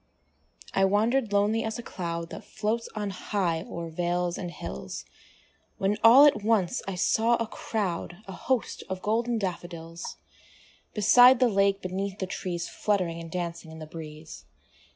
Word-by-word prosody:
I 195 - +3
wander'd 220 +4 +2
lonely 205 +3 +2
as 220 0 -3
a 240 - -7
cloud 170 -4 -5
That - - -7
floats 220 +2 -2
on 205 -2 -2
high 185 -4 -1
o'er 170 0 -6
vales 175 +1 -1
and 175 - -5
hills, 65 - -7 0.7
When 195 +2 +1
all 250 +6 +9
at 275 -8 +4
once 220 0 +2
I 195 - -3
saw 225 +6 +3
a 230 - -1
crowd, 190 -6 -3
A - - -6
host 245 +6 -2
of 190 0 -4
golden 230 +2 +1
daffodils, 170 -3 -5 0.8
Beside 245 +4 +7
the 250 -2 +4
lake, 195 -1 +2
beneath 190 +2 -3
the 190 - -2
trees, 175 -2 -4
Fluttering 180 -5 -1
and 165 - -8
dancing 170 -2 -4
in 160 - -10
the 155 - -7
breeze. 155 - -10
195 Hz, 155 wpm, -27 LUFS, 170-220 Hz, 0.8 s, all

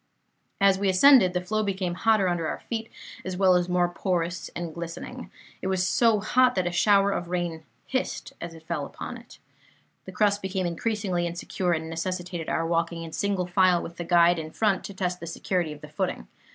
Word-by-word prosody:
"As 195 -1 +4
we 200 -1 +1
ascended, 190 -1 +6
the 180 - 0
flow 215 +3 0
became 190 -3 -1
hotter 215 +1 +3
under 170 -2 0
our - - -4
feet, 225 -1 -4 0.3
as 185 -1 -4
well 190 -1 +5
as 180 0 +2
more 180 0 +3
porous 175 -1 -2
and 170 -2 -4
glistening. 170 0 -7 0.3
It - - -3
was 190 -1 +1
so 230 -3 +3
hot 250 +4 +3
that 185 - +1
a 175 - 0
shower 200 +2 +4
of 175 - -3
rain 175 -2 -2 0.2
hissed 260 - -3
as 170 -1 -6
it 160 0 -15
fell 155 -4 -3
upon - - -7
it. - - -15 0.7
The 190 - -8
crust 205 +1 +2
became 190 -1 -2
increasingly 180 0 -1
insecure, 175 +1 -2
and 160 -1 -2
necessitated 175 0 -4
our 165 - 0
walking 165 0 -1
in 165 - -8
single 195 +2 -1
file 180 -1 +3
with 170 - -9
the 175 - -3
guide 170 0 +4
in 155 -1 -5
front, 200 +3 +1
to 200 - -8
test 180 -1 -2
the 170 - -7
security 170 0 -1
of 150 0 -10
the 150 - -9
footing. 180 +5 -3
180 Hz, 205 wpm, -26 LUFS, 170-195 Hz, 0.7 s, ascended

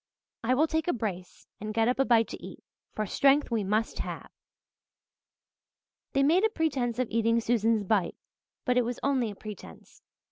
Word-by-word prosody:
I 250 +3 +2
will 300 +4 +4
take 320 0 -1
a 350 - +2
brace 190 -6 -5
and 215 +1 -5
get 225 0 +3
up 250 +2 0
a 270 - +4
bite 230 -3 +4
to - - -8
eat, - - -10 0.3
for 215 - -1
strength 275 +6 +3
we 225 -3 +1
must 215 +3 -1
have." - - -6 1.8
They 275 - +3
made 335 +8 +4
a 445 - +4
pretence 270 - -1
of 255 -1 0
eating 230 +1 +2
Susan's 225 -2 +1
"bite," 195 -3 0 0.5
but 250 -1 +2
it - - +2
was 240 +1 -4
only 265 -5 +1
a 205 - -8
pretence. 200 - -11
235 Hz, 180 wpm, -28 LUFS, 215-270 Hz, 1.8 s, will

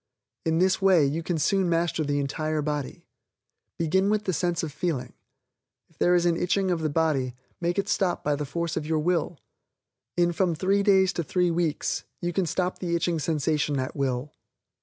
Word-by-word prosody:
In 160 0 +2
this 185 +2 +2
way, 185 -6 +5
you 150 +4 -1
can 165 0 -2
soon 185 +4 +2
master 170 -1 +1
the 145 -1 -1
entire 155 +2 -1
body. 150 -2 -4 0.7
Begin 190 +4 +2
with 210 0 +1
the 185 - -1
sense 175 +1 0
of 160 - -3
feeling. 140 -6 -3 0.8
If 165 - -30
there 175 0 +4
is 175 0 +2
an 170 -1 +2
itching 185 +2 +1
of 170 -2 0
the 155 - 0
body, 145 -5 0 0.2
make 175 +1 -1
it 200 - 0
stop 185 -3 0
by 145 0 +1
the 150 - -3
force 170 +3 -3
of 155 -1 -3
your 160 0 +1
will. 170 0 0 0.8
In 175 0 +3
from 175 -1 +1
three 195 +4 +2
days 195 -2 +4
to 170 - -2
three 180 +3 +1
weeks, 165 -3 -1 0.2
you 175 0 -2
can 190 -1 0
stop 180 +3 -1
the 170 -2 -1
itching 170 -1 0
sensation 150 -1 0
at 130 - -3
will. 135 0 -2
165 Hz, 195 wpm, -26 LUFS, 150-180 Hz, 0.8 s, way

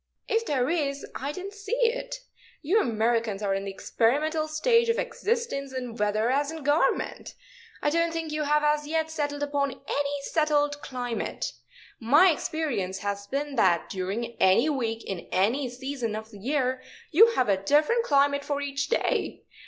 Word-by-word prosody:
"If 455 +1 0
there 260 -4 +1
is, 285 -4 -1
I 280 +2 -3
didn't 380 +5 -7
see 410 +4 -3
it. - - -1 0.4
You 385 +9 +3
Americans 225 - 0
are 195 -1 +1
in 195 0 -2
the - - -3
experimental 300 +10 0
stage 465 +10 +2
of 460 - +2
existence 450 - -2
in 250 -3 -5
weather 215 +2 +1
as 285 +2 +1
in 320 -2 -7
government. 290 +4 0 0.5
I 295 - +2
don't 335 +1 +2
think 325 -1 -4
you 305 0 -2
have 300 0 +2
as 300 0 +1
yet 320 0 -1
settled 290 -2 -2
upon 285 -1 0
any 285 +1 -3
settled 290 -1 +1
climate. 245 -3 -4 0.5
My 295 +11 +6
experience 260 - -2
has 200 0 -3
been 280 +3 -3
that 170 -3 +3
during 200 +6 -3
any 195 +11 +5
week 230 -5 -2
in 190 -3 -5
any 235 +9 +1
season 250 -3 -4
of 220 +1 -7
the 205 - -12
year 260 +2 0 0.3
you 455 +8 +6
have 250 - +2
a 195 -2 +2
different 300 - +3
climate 280 -4 +3
for 285 0 -2
each 280 -1 -2
day. - - 0
285 Hz, 170 wpm, -27 LUFS, 235-310 Hz, 0.5 s, My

